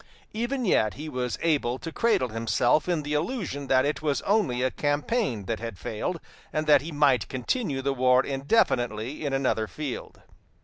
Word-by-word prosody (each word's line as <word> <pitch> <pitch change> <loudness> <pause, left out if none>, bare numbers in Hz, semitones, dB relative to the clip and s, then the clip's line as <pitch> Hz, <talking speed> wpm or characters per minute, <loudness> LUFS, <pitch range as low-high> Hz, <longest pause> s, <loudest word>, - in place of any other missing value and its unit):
Even 240 +3 -2
yet 110 - +2
he 150 +3 -7
was 125 -4 -3
able 140 -7 +1
to 165 +4 -7
cradle 190 - +1
himself 115 +8 +1
in 170 -4 0
the 145 +1 -3
illusion 150 - -2
that 130 0 +4
it 150 +2 -1
was 150 -2 0
only 170 - +1
a 130 - +1
campaign 145 - -1
that 115 +1 -2
had 115 -4 -6
failed, 140 - -3 0.3
and 155 0 -1
that 145 -3 +6
he 160 +4 -6
might 145 -4 +3
continue 135 - -2
the 140 0 +1
war 125 0 +4
indefinitely 135 - 0
in 145 - -1
another 130 -5 0
field. 145 +2 -6
140 Hz, 175 wpm, -26 LUFS, 125-155 Hz, 0.3 s, that